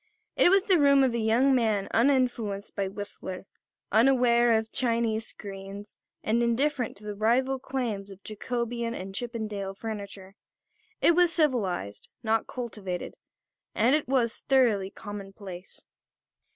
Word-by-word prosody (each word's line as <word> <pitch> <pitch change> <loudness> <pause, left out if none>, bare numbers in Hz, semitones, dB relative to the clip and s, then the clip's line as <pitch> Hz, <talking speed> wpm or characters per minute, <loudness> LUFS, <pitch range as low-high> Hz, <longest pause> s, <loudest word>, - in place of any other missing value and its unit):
It - - +5
was 390 +1 +4
the 375 -5 +3
room 280 -1 +5
of 255 -3 +2
a 235 - -1
young 235 +5 +3
man 220 -5 +1
uninfluenced 235 -5 +1
by 200 -2 -1
Whistler, 190 -1 -7 0.5
unaware 240 0 +4
of 220 0 -4
Chinese 230 -3 0
screens 200 0 -9 0.3
and 230 +2 +1
indifferent 245 +1 0
to 210 - -16
the 210 0 -5
rival 250 +6 +1
claims 240 -7 -3
of 195 0 -13
Jacobean 235 +1 -3
and 190 +1 -7
Chippendale 215 -4 -4
furniture. 200 -3 -7 0.7
It 340 - +5
was 350 0 +4
civilised, 215 - 0
not 220 0 +1
cultivated; 210 -7 -5 0.6
and 235 +5 +3
it 305 0 +1
was 245 -3 +1
thoroughly 230 -8 +3
commonplace. 195 -3 -9
225 Hz, 130 wpm, -27 LUFS, 200-255 Hz, 0.7 s, It